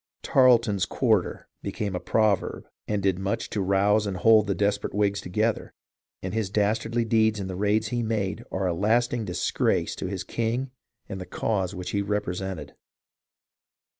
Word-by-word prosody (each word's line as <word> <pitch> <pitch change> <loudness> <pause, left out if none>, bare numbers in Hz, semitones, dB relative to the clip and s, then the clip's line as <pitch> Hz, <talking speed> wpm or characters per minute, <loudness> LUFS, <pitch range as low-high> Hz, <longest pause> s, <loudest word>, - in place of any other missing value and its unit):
" - - -58
Tarleton's 115 -7 +4
quar 110 -7 +3
ter" - - -9
became 100 -3 -3
a - - -1
proverb 105 -2 0 0.2
and 105 -2 -1
did 95 -2 +1
much 95 +1 -2
to 105 - -1
rouse 100 +2 +2
and 95 -2 -3
hold 110 +1 +5
the 100 - 0
desperate 100 -1 -1
Whigs 100 -1 +1
together, 110 +5 -1 0.5
and 95 0 -4
his 110 -3 -1
dastardly 110 +3 0
deeds 110 -1 +2
in 95 - -3
the 95 -1 -5
raids 105 +2 +1
he 120 +1 -1
made 110 -1 -2
are 95 0 -1
a 90 - +1
lasting 115 +5 +1
disgrace 90 -3 0
to - - -3
his 95 -1 -4
king 120 +3 -2 0.4
and 95 - -6
the 90 - -7
cause 95 -4 -1 0.2
he 100 - 0
represented. 95 -5 -3
105 Hz, 165 wpm, -26 LUFS, 95-110 Hz, 0.5 s, hold